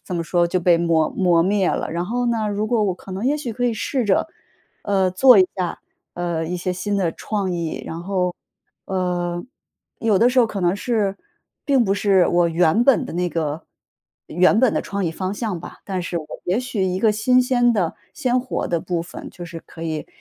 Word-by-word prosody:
怎 180 - -5
么 170 - -1
说 175 +1 +2
就 180 +2 0
被 175 0 +4
磨 165 -2 +2
磨 175 -3 +3
灭 195 +1 +2
了。 - - -2
然 170 +2 -2
后 245 +4 -1
呢， 225 -3 0
如 205 +1 -1
果 225 -1 +1
我 190 - 0
可 185 +1 -11
能 195 +5 -4
也 290 +3 +2
许 255 -6 -4
可 245 +3 -2
以 235 - +1
试 255 +3 -1
着， 195 - +2 0.6
呃， 190 -2 +1
做 250 +5 +7
一 185 - +6
下 180 -3 -3 0.3
呃， 170 -2 -2
一 180 +2 -3
些 180 +1 -2
新 205 +3 -2
的 180 -4 +1
创 200 -4 -3
意， 170 -2 -3
然 165 - -5
后， 180 -1 -1 0.5
呃， 175 -2 -2 0.6
有 220 -3 +2
的 235 - +5
时 255 +1 +1
候 240 - +6
可 205 -3 -5
能 175 +1 +2
是 205 -4 -1 0.5
并 270 -5 +3
不 195 - +1
是 195 -3 +3
我 175 -1 +3
原 165 +5 +3
本 270 -4 +4
的 - - -7
那 180 +1 0
个 155 -1 -3 0.7
原 180 +5 +3
本 255 -4 +4
的 - - 0
创 200 -1 -3
意 165 - 0
方 185 +4 -3
向 210 -5 -3
吧， - - -10
但 190 -2 -3
是 175 0 -4
我 155 - -7 0.2
也 185 +5 +1
许 250 -6 -3
一 185 0 -1
个 220 0 +4
新 250 +4 +3
鲜 245 -1 +3
的 180 -7 0 0.2
鲜 255 -4 +1
活 255 +1 -3
的 170 - +1
部 170 0 -2
分， 170 - -9
就 175 - -9
是 170 -1 -8
可 165 - -11
以 160 -2 -3
185 Hz, 240 characters per minute, -21 LUFS, 175-220 Hz, 0.7 s, 做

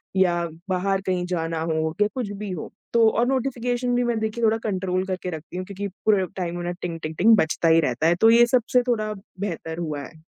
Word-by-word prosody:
या 175 -2 +2 0.2
बाहर 190 +1 0
कहीं 180 -1 0
जाना 165 -2 -2
हो 160 -1 -1
या 210 - +5
कुछ 240 -6 -3
भी 210 -2 -5
हो। 175 -4 -6 0.2
तो 230 -1 +5
और 230 +2 +1
नोटिफिकेशन 245 -2 0
भी 245 - +2
मैं 240 -2 0
देखिए 220 +2 -3
थोड़ा 220 0 +4
कंट्रोल 185 -2 -1
करके 185 -1 -3
रखती 165 +1 -7
हूँ 185 - -4
क्योंकि 200 +1 -5 0.2
पूरे 205 -3 +4
टाइम 175 -1 -3
उन्हें 175 0 -3
टिंग 170 -2 -4
टिंग 155 +1 -4
टिंग 220 +4 +6
बजता 160 -1 +1
ही 165 0 +6
रहता 145 +2 0
है। 170 - +4
तो 225 - +7
ये 235 +1 +7
सबसे 245 0 +2
थोड़ा 215 -3 0 0.3
बेहतर 165 -4 -4
हुआ 155 -4 -3
है। 160 +3 -13
190 Hz, 220 wpm, -24 LUFS, 170-225 Hz, 0.3 s, तो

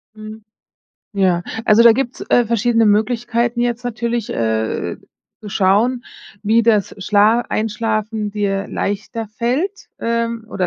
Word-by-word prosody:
Mhm. 215 0 -10 0.7
Ja, 180 -3 +2 0.2
also, 220 +1 +5
da 235 -1 +8
gibt's, 255 0 -3
äh, 245 - +4
verschiedene 230 0 +2
Möglichkeiten 235 +2 +1
jetzt 240 0 -1
natürlich, 235 -1 -2
äh, 110 -1 -2 0.4
zu 210 - -9
schauen, 215 +7 +1 0.4
wie 225 +2 +3
das 215 -4 +2
Schla 210 +4 +3
Einschlafen 215 -1 -2
dir 200 -1 -2
leichter 215 +2 -4
fällt, 260 - -2
ähm, 230 -1 -2
oder 185 -2 -1
220 Hz, 125 wpm, -18 LUFS, 205-235 Hz, 0.7 s, da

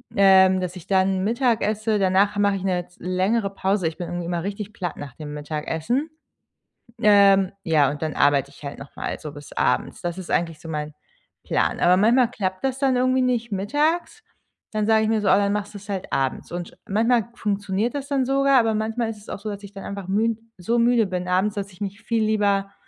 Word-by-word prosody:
Ähm, 190 -1 +6
dass 180 0 -4
ich 180 - -11
dann 190 -1 +2
Mittag 235 +1 +1
esse, 215 0 0
danach 195 +2 +3
mache 200 -1 +2
ich 190 - -5
'ne 180 -2 -1
z 180 - -26
längere 195 +3 0
Pause. 195 -2 0
Ich 160 - -5
bin 175 - -5
irgendwie 175 0 -4
immer 170 0 -2
richtig 205 +1 -5
platt 175 -4 -4
nach 140 -4 -8
dem 150 -2 -7
Mittagessen. 160 - -2 0.9
Ähm, 200 -2 +5
ja, 150 -6 +3
und 150 - -7
dann 155 -1 -2
arbeite 140 -1 +3
ich 140 - -17
halt 140 - -6
nochmal 135 - -6
so 150 -1 -8
bis 145 0 -11
abends. - - 0
Das 175 +1 -3
ist 185 - -7
eigentlich 165 -2 0
so 165 - -9
mein 150 -1 -4 0.5
Plan. - - 0
Aber 180 +1 +5
manchmal 235 +4 +4
klappt 185 -2 -3
das 265 0 -1
dann 265 -2 +2
irgendwie 255 +1 +2
nicht 240 -3 0
mittags, 305 - -1 0.5
dann 215 -1 -1
sage 220 -1 +4
ich 220 - 0
mir 220 -2 +1
so: 200 - -1
„Ah, - - +6
dann 200 0 +1
machst 205 0 -3
du - - -7
es 205 +1 -16
halt 190 -2 -4
abends" 135 +3 -1
und 175 0 -5
sch - - -20
manchmal 230 +2 +2
funktioniert 205 +1 -1
das 280 -1 -4
dann 270 -2 +1
sogar, 275 0 +4
aber 225 -1 +2
manchmal 225 +2 -1
ist 220 - -6
es 205 - -15
auch - - -5
so, 215 +1 -5
dass 205 0 -7
ich 200 0 -11
dann 195 - -8
einfach 200 -2 -6
münd 220 +3 +1 0.2
so 230 +7 0
müde 235 -2 +4
bin 180 -1 -3
abends, 190 +4 +1
dass 200 -1 -4
ich 185 - -19
mich 200 +2 -5
viel 225 0 0
lieber, 200 -2 +1
200 Hz, 225 wpm, -23 LUFS, 180-225 Hz, 0.9 s, Ähm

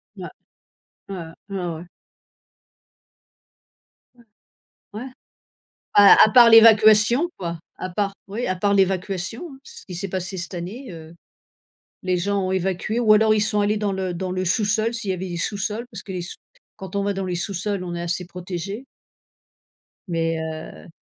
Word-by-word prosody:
Ouais. - - -8 0.8
Ouais, 195 - -5 0.3
ouais, 195 - -5
ouais, 180 -2 -3
ouais. 165 +3 -9 2.3
Ouais. 240 - -21 0.7
Ouais. 225 +5 -6 0.9
À 205 -1 +8
à - - +1
part 240 -1 +8
l'évacuation, 225 +5 +6
quoi. 170 -3 -5 0.2
A 185 - -5
part 195 +2 -2
oui, 215 +5 -4
à 185 - -1
part 200 +2 +1
l'évacuation, 195 - -1
hein. 265 - -13
C'est - - -12
ce - - -18
qui 180 - -8
s'est 180 +3 -4
passé 190 +1 -4
cette 175 +2 -5
année, 200 +10 -7
heu. 165 0 -11 0.9
Les 185 -1 0
gens 200 +1 -1
ont 185 - -1
évacué 190 +4 -1
ou 220 -3 +5
alors 215 0 +5
ils 215 - +1
sont 210 0 +1
allés 205 +1 +1
dans 205 -1 -1
le 190 -2 -3
dans 185 +2 -4
le 185 0 -2
sous-sol 215 +4 +1
s'il 230 -4 -3
y - - +2
avait 185 +1 -5
des 175 - -5
sous-sols. 215 +5 -3
Parce 215 -5 -8
que 195 - -8
les 180 -1 -4
sous 175 - -8 0.4
quand 190 -1 -9
on 200 - 0
va 200 0 -1
dans 195 0 -3
les 180 -1 -3
sous-sols, 200 +2 -3
on 175 -1 -5
est 170 - -4
assez 175 +1 -3
protégé. 180 +6 -6 1.2
Mais 165 -2 -1
heu 160 +1 -7
195 Hz, 175 wpm, -22 LUFS, 180-215 Hz, 2.3 s, À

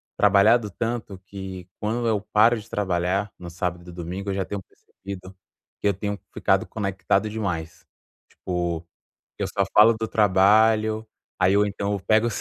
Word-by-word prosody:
trabalhado 105 +2 +4
tanto 115 -1 -4
que 95 -2 -8
quando 115 +3 -1
eu 105 -3 +1
paro 115 +3 +5
de 110 - -14
trabalhar, 95 0 -1
no 90 -1 -9
sábado 90 0 -4
e - - -8
domingo, 90 +3 -5
eu - - 0
já 95 -2 -1
tenho 100 0 -5
percebido 95 0 -11 0.5
que 105 - +1
eu 100 - +3
tenho 100 +2 -3 0.2
ficado 95 -1 +2
conectado 100 +1 -1
demais. 90 -7 -4 0.5
Tipo, 85 -2 -3 0.5
eu - - -1
só 100 - 0
falo 110 +2 +7
do 110 0 -3
trabalho, 110 +2 +3 0.3
aí 95 +2 +4
ou 105 0 +4
então 100 0 -2
eu 100 - -2
pego 110 +4 +3
o - - 0
100 Hz, 165 wpm, -24 LUFS, 95-110 Hz, 0.5 s, falo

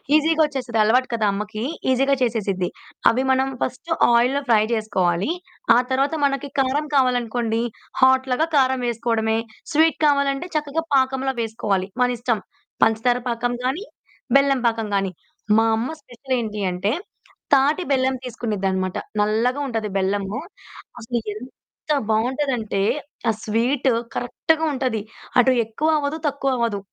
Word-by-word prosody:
ఈసీగా 315 +1 +3
వచ్చేస్తది. 265 -6 -3
అలవాటు 250 +4 +3
కదా! 225 -2 +1
అమ్మకి, 210 +2 -4 0.3
ఈసీగా 270 +2 +3
చేసేసిద్ది. 205 -7 0 0.4
అవి 255 +3 +1
మనం 265 0 +2
ఫస్ట్ 255 +6 -4 0.2
ఆయిల్‌లో 250 +4 +3
ఫ్రై 220 -2 +5
చేసుకోవాలి. 190 - 0 0.4
ఆ - - +6
తర్వాత 270 +4 +1
మనకి 275 0 -1
కారం 270 +3 +1
కావాలనుకోండి 240 -3 +1 0.4
హాట్ 260 0 +5
లాగా 310 +6 +2
కారం 260 -1 +3
వేసుకోవడమే. 230 -1 0 0.3
స్వీట్ 320 +2 +3
కావాలంటే 280 +2 +2
చక్కగా 305 +1 -1
పాకంలో 265 0 +1
వేసుకోవాలి. 205 -4 -1
మన 250 - +5
ఇష్టం, 235 -2 0 0.4
పంచదార 225 +2 +3
పాకం 240 0 -1
గాని, 270 +10 -1 0.5
బెల్లం 275 -2 +2
పాకం 225 -1 -1
గాని. 195 -1 0 0.5
మా 225 - +5
అమ్మ 230 +3 -2
స్పెషలేంటి 245 -5 -4
అంటే 180 +4 -1 0.6
తాటి 285 +6 +4
బెల్లం 265 -1 +2
తీసుకునేదన్నమాట. 195 -6 -2 0.2
నల్లగా 225 +6 +1
ఉంటది 225 -4 -2
బెల్లము. 195 +1 -1 0.6
అసలెంత 235 +5 -4
బాగుంటదంటే, 235 -2 0 0.5
ఆ - - +5
స్వీటు 245 +4 +1 0.2
కరెక్ట్‌గా 320 +6 0
ఉంటది. 255 -5 -1 0.4
అటు 260 +1 +5
ఎక్కువ 255 +8 -1
అవ్వదు, 295 +2 -2
తక్కువ 275 -1 -1
అవ్వదు. 230 -4 0
245 Hz, 125 wpm, -22 LUFS, 220-270 Hz, 0.6 s, ఆ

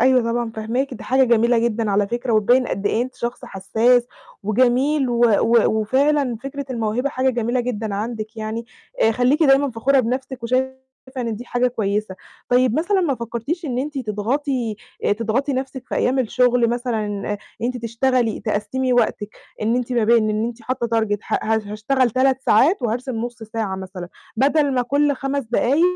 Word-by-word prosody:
أيوه، 255 +1 +4
طبعًا 235 -1 -1
فاهماكِ، 235 +5 -2
دي - - -10
حاجة 265 +1 +3
جميلة 235 0 +3
جدًا 230 -2 0
على 200 0 +1
فكرة، 240 +1 -2
وتبيِّن 240 +4 +3
قد 195 +2 -3
إيه 225 - +1
أنتِ 255 0 -6
شخص 240 +1 -5
حساس، 235 +5 +2 0.4
وجميل، 255 +6 +2
و 240 - -1 0.2
و 230 -1 +3
وفعلًا 265 +3 +1
فكرة 280 +1 -5
الموهبة 230 +2 -1
حاجة 260 -1 +1
جميلة 240 +1 0
جدًا 225 -4 -3
عندِك 220 +1 -4
يعني، 220 +1 -4 0.4
آآ 225 - +5
خليكِ 255 +7 +2
دايمًا 275 -1 +4
فخورة 265 +4 +2
بنفسِك 255 +1 -3
وشايفة 260 +2 0 0.4
إن 230 -3 -2
دي 240 - -8
حاجة 245 +1 0
كويسة. 210 -4 -2 0.3
طيب 250 -1 +3
مثلًا 380 +4 +1
ما 315 -7 +1
فكرتيش 235 +9 -4
إن 250 -5 -2
أنتِ 285 +1 -3
تضغطي 235 +1 -2 0.4
تضغطي 230 +5 0
نفسِك 260 -1 -4
في - - -3
أيام 260 +2 +1
الشغل 245 -1 +2
مثلًا 240 -3 -1
إن 205 0 -3 0.3
أنتِ 250 +1 -1
تشتغلي، 235 0 0
تقسِّمي 225 +5 -1
وقتِك، 220 -3 +1 0.3
إن 230 +3 +1
إنتِ 250 0 -2
ما 235 -3 +2
بين 225 -1 +4
إن 215 +1 0
أنتِ 235 0 -5
حاطة 255 0 -2
target 205 -2 -1
ه - - -1
ه 220 0 +1
هاشتغل 245 +4 +1
3 260 +2 +2
ساعات 265 - +3
وهارسم 240 +2 -2
نص 235 +1 -5
ساعة 220 -3 -3
مثلًا، 185 -2 -7 0.3
بدل 285 +3 +2
ما 250 - +2
كُلّ 285 +3 +1
5 275 +1 -2
دقايق 245 +6 +1
240 Hz, 175 wpm, -21 LUFS, 220-260 Hz, 0.4 s, آآ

